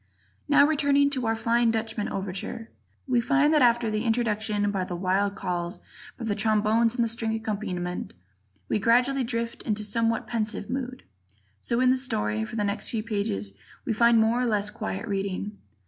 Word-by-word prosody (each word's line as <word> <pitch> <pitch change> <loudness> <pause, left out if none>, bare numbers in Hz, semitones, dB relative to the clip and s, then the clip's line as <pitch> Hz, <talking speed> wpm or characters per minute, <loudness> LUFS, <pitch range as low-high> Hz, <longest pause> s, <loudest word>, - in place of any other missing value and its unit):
Now, 285 -1 +7
returning 285 -2 +3
to 255 -4 -1
our 225 - +2
"Flying 235 +1 +2
Dutchman" 225 -1 -2
overture, 195 +4 -5 0.4
we 245 -2 +3
find 285 +5 +3
that 305 - +4
after 235 -2 +3
the 215 +1 -1
introduction 215 -3 0
by 195 -2 -1
the 180 -1 -5
wild 195 +3 0
calls 175 -1 -3 0.4
by 235 - -5
the 215 - 0
trombones 220 +2 +2
and 240 - +2
the - - +1
string 225 -1 -1
accompaniment, 200 -5 -4 0.5
we - - 0
gradually 250 +5 +3
drift 230 -1 -3
into 210 -1 -1
a - - -5
somewhat 225 +2 0
pensive 220 -1 -2
mood; 255 -1 -4 0.6
so 235 - -1
in 255 0 +5
the 260 - +3
story, 105 - -1
for 110 - -6
the 210 - 0
next 200 +1 -2
few 220 -2 -2
pages 200 - -2 0.3
we 230 - 0
find 235 +1 +5
more 225 +3 +3
or 250 - +1
less 210 -2 0
quiet 215 -1 -4
reading. 200 0 -3
225 Hz, 180 wpm, -26 LUFS, 205-240 Hz, 0.6 s, Now